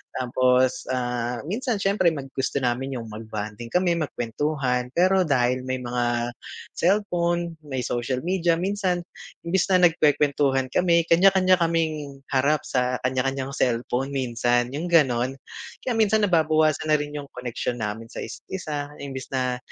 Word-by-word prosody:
Tapos, 130 Hz, 0 st, +2 dB
ah, 120 Hz, -1 st, -2 dB
minsan 240 Hz, +5 st, -1 dB
syempre 195 Hz, -2 st, +2 dB
mag 140 Hz, -4 st, -6 dB
gusto 135 Hz, -1 st, -2 dB
namin 130 Hz, +2 st, -1 dB
yung 115 Hz, -1 st, -8 dB
mag-bonding 110 Hz, +1 st, -6 dB
kami 175 Hz, +3 st, +1 dB
magkwentuhan, 125 Hz, -1 st, -1 dB
pero 185 Hz, 0 st, +3 dB
dahil 130 Hz, -1 st, +1 dB
may 130 Hz, -1 st, -2 dB
mga 120 Hz, 0 st, -1 dB, 0.4 s
cellphone, 175 Hz, -3 st, 0 dB
may 130 Hz, -3 st, -3 dB
social 125 Hz, +2 st, -2 dB
media 175 Hz, -2 st, +1 dB
minsan 185 Hz, -1 st, -1 dB, 0.4 s
imbes 170 Hz, +1 st, +1 dB
na 185 Hz, -2 st, +3 dB
nagkwekwentuhan 140 Hz, -4 st, +1 dB
kami 170 Hz, -2 st, +3 dB
kanya-kanya 185 Hz, +1 st, +5 dB
kaming 155 Hz, -4 st, -1 dB
harap 140 Hz, +2 st, +2 dB
sa 125 Hz, 0 st, 0 dB
kanya-kanyang 130 Hz, +1 st, -1 dB
cellphone 125 Hz, +1 st, -1 dB
minsan 120 Hz, -1 st, +1 dB
yung, 160 Hz, +4 st, -3 dB
ganon. 130 Hz, -6 st, +3 dB, 0.5 s
Kaya 250 Hz, -, 0 dB
minsan, 215 Hz, 0 st, +3 dB
nababawasan 155 Hz, -4 st, +2 dB
na 155 Hz, -, +4 dB
rin 145 Hz, 0 st, -5 dB
yung 145 Hz, -, -6 dB
koneksyon 125 Hz, 0 st, -4 dB
namin 110 Hz, +2 st, -3 dB
sa -, -, -11 dB
isa't -, -, -8 dB
isa, 150 Hz, -6 st, -4 dB
imbes 135 Hz, -2 st, -6 dB
na 125 Hz, -1 st, 0 dB
140 Hz, 140 wpm, -24 LUFS, 125-170 Hz, 0.5 s, kanya-kanya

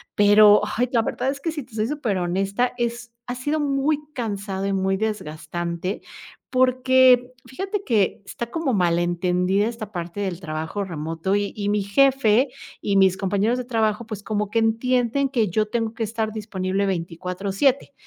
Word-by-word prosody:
Pero, 205 Hz, 0 st, +7 dB, 0.2 s
ay, 250 Hz, +1 st, +1 dB
la 235 Hz, -, +3 dB
verdad 260 Hz, -, -2 dB
es 275 Hz, 0 st, -3 dB
que 330 Hz, -, -1 dB
si 310 Hz, -2 st, -5 dB
te 240 Hz, -3 st, -17 dB
soy 215 Hz, -1 st, 0 dB
superhonesta 200 Hz, -4 st, -1 dB
es 235 Hz, 0 st, -3 dB, 0.2 s
ha 245 Hz, -, -3 dB
sido 290 Hz, +5 st, -1 dB
muy 285 Hz, +1 st, +1 dB
cansado 200 Hz, -5 st, -3 dB
y 200 Hz, -, 0 dB
muy 190 Hz, 0 st, +1 dB
desgastante 175 Hz, -2 st, -3 dB, 0.5 s
porque, 255 Hz, -1 st, +4 dB
fíjate 390 Hz, +8 st, -4 dB
que 210 Hz, -, +1 dB
está 235 Hz, +3 st, -6 dB
como 285 Hz, 0 st, -1 dB
mal 175 Hz, -4 st, +2 dB
entendida 180 Hz, +3 st, +1 dB
esta 225 Hz, -3 st, -6 dB
parte 175 Hz, +1 st, -5 dB
del 185 Hz, -4 st, -3 dB
trabajo 160 Hz, +3 st, -4 dB
remoto 165 Hz, +1 st, -2 dB
y 205 Hz, 0 st, -1 dB
y 205 Hz, -1 st, -2 dB
mi 205 Hz, -1 st, +1 dB
jefe 260 Hz, +2 st, +3 dB, 0.3 s
y 200 Hz, -1 st, +1 dB
mis 190 Hz, -1 st, +4 dB
compañeros 200 Hz, +6 st, 0 dB
de 250 Hz, -, -4 dB
trabajo, 225 Hz, -2 st, 0 dB
pues 210 Hz, -2 st, -6 dB
como 210 Hz, -1 st, -2 dB
que 230 Hz, -, -2 dB
entienden 245 Hz, +4 st, +1 dB
que 230 Hz, -6 st, +1 dB
yo 215 Hz, +5 st, +1 dB
tengo 225 Hz, 0 st, -2 dB
que 230 Hz, -, -9 dB
estar 220 Hz, 0 st, -2 dB
disponible 200 Hz, -2 st, -2 dB
24/7 190 Hz, -, -1 dB
215 Hz, 165 wpm, -23 LUFS, 190-245 Hz, 0.5 s, Pero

